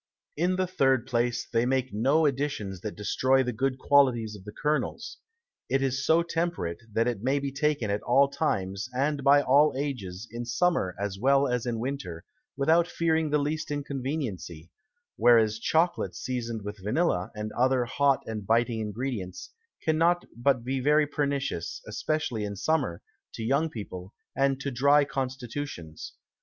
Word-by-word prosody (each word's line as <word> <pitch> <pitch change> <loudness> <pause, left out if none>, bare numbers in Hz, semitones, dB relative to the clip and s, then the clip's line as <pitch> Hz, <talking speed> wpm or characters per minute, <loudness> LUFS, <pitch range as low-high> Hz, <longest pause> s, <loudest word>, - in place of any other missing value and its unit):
In 175 +4 +1
the 185 0 +1
third 135 -9 +2
place, 120 -1 0
they 115 - +1
make 130 -1 0
no 135 +9 +3
Additions 135 - -2
that 105 - -5
destroy 130 +5 +2
the 125 -1 -2
good 130 +3 -1
Qualities 125 -6 +3
of 95 -2 -13
the 105 - -7
Kernels; 150 - -2 0.5
it 135 0 +1
is 135 0 -1
so 165 +1 +4
temperate, 165 - -2
that 115 +3 +1
it 120 -5 -2
may 135 +4 +1
be 140 -1 -2
taken 140 -6 0
at 100 - -1
all 135 +3 +4
Times, 100 -10 -2
and 140 +2 0
by 145 +1 +6
all 140 +2 +4
Ages, 120 -8 -4
in 120 +1 -5
Summer 120 - 0
as 100 -1 -3
well 140 +3 +4
as 125 -1 -1
in 120 -1 -1
Winter, 115 -10 -5 0.3
without 160 +5 +3
fearing 160 -2 0
the 150 - +3
least 150 +2 -2
Inconveniency: 135 - -4 0.5
Whereas 110 -3 +4
Chocolate 160 - +1
season'd 115 -4 -4
with 105 0 -6
Vanilla, 105 - 0
and 105 0 -4
other 130 0 +2
hot 140 +2 +2
and 110 -2 -5
biting 115 +2 +1
Ingredients, 105 -4 -4 0.3
cannot 165 +3 +2
but 120 0 +1
be 130 +2 -1
very 150 +3 +4
pernicious, 140 - -2
especially 120 0 -2
in 100 0 -4
Summer, 105 - -1 0.3
to 115 - -5
young 140 +7 +1
People, 95 -5 -8 0.2
and 135 0 +1
to 140 - -3
dry 140 +3 +4
Constitutions. 130 - -5
130 Hz, 160 wpm, -27 LUFS, 110-145 Hz, 0.5 s, by